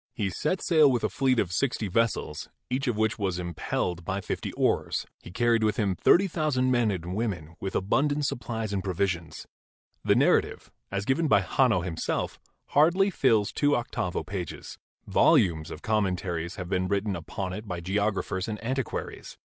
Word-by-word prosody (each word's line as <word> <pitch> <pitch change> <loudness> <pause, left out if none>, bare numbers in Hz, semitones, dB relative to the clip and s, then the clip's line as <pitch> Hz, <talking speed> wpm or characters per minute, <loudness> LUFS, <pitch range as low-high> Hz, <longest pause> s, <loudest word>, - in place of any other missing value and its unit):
He 100 -4 -1
set 185 - -1
sail 155 -5 +5
with 120 -2 0
a - - +1
fleet 130 -2 +1
of 90 -6 +1
sixty 115 +2 0
vessels, 105 -7 -1 0.2
each 130 +2 -1
of 120 -4 0
which 110 +1 0
was 95 -3 -1
impelled 85 0 -3
by 95 +2 -2
fifty 95 - -4
oars. - - 0 0.2
He - - -11
carried 115 +4 +2
with 105 -1 +1
him 105 -3 +1
22 - - +1
GEOLOGY - - -15
thirty 195 +3 +6
thousand 150 -7 0
men 120 -3 +3
and 90 -2 -3
women, 90 -8 -3
with 95 - -4
abundant 145 +9 +1
supplies 115 -5 -3
and 95 -2 -1
provisions. 90 -3 -2 0.6
The - - +3
narrative, - - +2 0.2
as 100 +1 -3
given 155 +6 +1
by 100 -8 +5
Hanno 110 0 +2
himself, 85 -2 -3 0.3
hardly 175 +7 +4
fills 115 - +2
two 145 0 +2
octavo 95 -6 -2
pages; 95 -4 -6 0.3
volumes 80 -4 +3
of 75 - -9
commentaries 90 -5 -1
have 90 -3 -6
been 95 0 0
written 100 +1 0
upon 90 +3 -5
it 105 +3 -7
by 90 -3 -4
geographers 95 0 -1
and 110 -1 -3
antiquaries. 130 +1 -4
105 Hz, 175 wpm, -27 LUFS, 90-125 Hz, 0.6 s, thirty